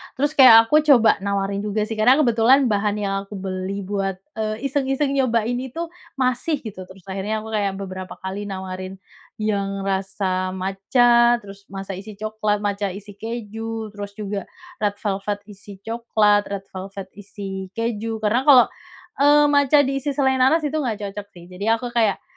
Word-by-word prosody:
terus 290 Hz, +3 st, 0 dB
kayak 250 Hz, -6 st, +9 dB
aku 300 Hz, +7 st, +4 dB
coba 260 Hz, -9 st, +5 dB
nawarin 200 Hz, 0 st, -1 dB
juga 210 Hz, +1 st, -1 dB
sih, 215 Hz, 0 st, -5 dB
karena 250 Hz, +5 st, +6 dB
kebetulan 250 Hz, -1 st, +4 dB
bahan 205 Hz, 0 st, +1 dB
yang 200 Hz, -2 st, -2 dB
aku 205 Hz, -, -9 dB
beli 190 Hz, +1 st, -4 dB
buat, 195 Hz, -1 st, -2 dB, 0.2 s
eee, 215 Hz, +2 st, -4 dB
iseng-iseng 275 Hz, 0 st, 0 dB
nyobain 245 Hz, -3 st, +1 dB
itu 325 Hz, +6 st, -5 dB, 0.2 s
masih, 260 Hz, +3 st, -1 dB
gitu. 185 Hz, -5 st, -8 dB
Terus 190 Hz, -1 st, -15 dB
akhirnya 200 Hz, +3 st, -3 dB
aku 220 Hz, -, -8 dB
kayak 200 Hz, -2 st, 0 dB
beberapa 185 Hz, -1 st, -7 dB
kali 195 Hz, +2 st, -4 dB
nawarin 190 Hz, -1 st, -6 dB, 0.4 s
yang 200 Hz, -2 st, -2 dB
rasa 190 Hz, -1 st, -2 dB
matcha, 235 Hz, +6 st, +3 dB
terus 200 Hz, 0 st, -13 dB
masa 195 Hz, 0 st, -7 dB
isi 205 Hz, +1 st, -10 dB
coklat, 215 Hz, 0 st, -2 dB
matcha 200 Hz, -2 st, -2 dB
isi 205 Hz, 0 st, -10 dB
keju, 225 Hz, +1 st, -6 dB
terus 205 Hz, -1 st, -8 dB
juga 205 Hz, -2 st, -5 dB, 0.3 s
red 205 Hz, -1 st, 0 dB
velvet 205 Hz, 0 st, -3 dB
isi 200 Hz, -1 st, -13 dB
coklat, 215 Hz, -3 st, +2 dB
red 200 Hz, -1 st, -5 dB
velvet 190 Hz, 0 st, -8 dB
isi 195 Hz, -1 st, -7 dB
keju. 225 Hz, -1 st, -3 dB
Karena 240 Hz, +6 st, +1 dB
kalau, 265 Hz, -4 st, +8 dB, 0.5 s
eee, 295 Hz, +1 st, +6 dB
matcha 285 Hz, 0 st, +5 dB
diisi 275 Hz, +1 st, -2 dB
selai 265 Hz, -2 st, +2 dB
nanas 310 Hz, +6 st, +4 dB
itu 300 Hz, +1 st, -1 dB
nggak 220 Hz, -7 st, -3 dB
cocok 205 Hz, 0 st, -7 dB
sih, 175 Hz, -, -12 dB
jadi 205 Hz, +5 st, +1 dB
aku 240 Hz, +1 st, -6 dB
kayak 225 Hz, -4 st, +1 dB
210 Hz, 165 wpm, -22 LUFS, 195-240 Hz, 0.5 s, kayak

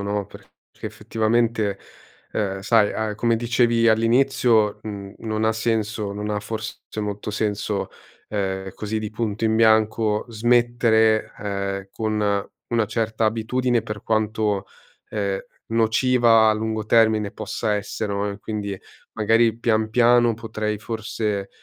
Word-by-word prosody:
no, 100 Hz, 0 st, -2 dB
perché -, -, -14 dB, 0.4 s
effettivamente, 110 Hz, -2 st, 0 dB, 0.5 s
ehm, 95 Hz, -2 st, -2 dB
sai 105 Hz, +1 st, +3 dB
a 110 Hz, -1 st, -2 dB
come 115 Hz, +1 st, +2 dB
dicevi 115 Hz, 0 st, +2 dB
all'inizio 115 Hz, -2 st, +3 dB
n 100 Hz, -2 st, -6 dB
non 110 Hz, -1 st, -3 dB
ha 110 Hz, -, +3 dB
senso 110 Hz, -2 st, -1 dB
non 105 Hz, +1 st, -4 dB
ha 105 Hz, -, 0 dB
forse 110 Hz, +1 st, -5 dB, 0.2 s
molto 105 Hz, 0 st, -4 dB
senso, 105 Hz, -1 st, -2 dB, 0.4 s
ehm, 95 Hz, -2 st, -2 dB
così 110 Hz, +1 st, -3 dB
di 105 Hz, -1 st, -4 dB
punto 110 Hz, -1 st, -3 dB
in 110 Hz, 0 st, +2 dB
bianco, 110 Hz, -1 st, +3 dB
smettere, 115 Hz, -1 st, +2 dB
ehm, 100 Hz, -1 st, -4 dB
con 105 Hz, -2 st, -1 dB, 0.2 s
una 115 Hz, -2 st, +1 dB
certa 110 Hz, 0 st, -1 dB
abitudine 115 Hz, +2 st, +1 dB
per 105 Hz, -1 st, -7 dB
quanto, 110 Hz, -2 st, 0 dB, 0.4 s
ehm, 100 Hz, -2 st, -1 dB, 0.3 s
nociva 115 Hz, 0 st, +4 dB
a 110 Hz, -, +5 dB
lungo 110 Hz, 0 st, -3 dB
termine 110 Hz, -2 st, +3 dB
possa 110 Hz, -2 st, -2 dB
essere 105 Hz, 0 st, -3 dB
no, 100 Hz, +1 st, -1 dB
e 100 Hz, -, -7 dB
quindi 100 Hz, -2 st, -4 dB, 0.4 s
magari 115 Hz, +1 st, +3 dB
pian 110 Hz, -2 st, +1 dB
piano 120 Hz, 0 st, +4 dB
potrei 110 Hz, -2 st, -3 dB
forse, 110 Hz, -2 st, -3 dB
110 Hz, 130 wpm, -23 LUFS, 105-115 Hz, 0.5 s, a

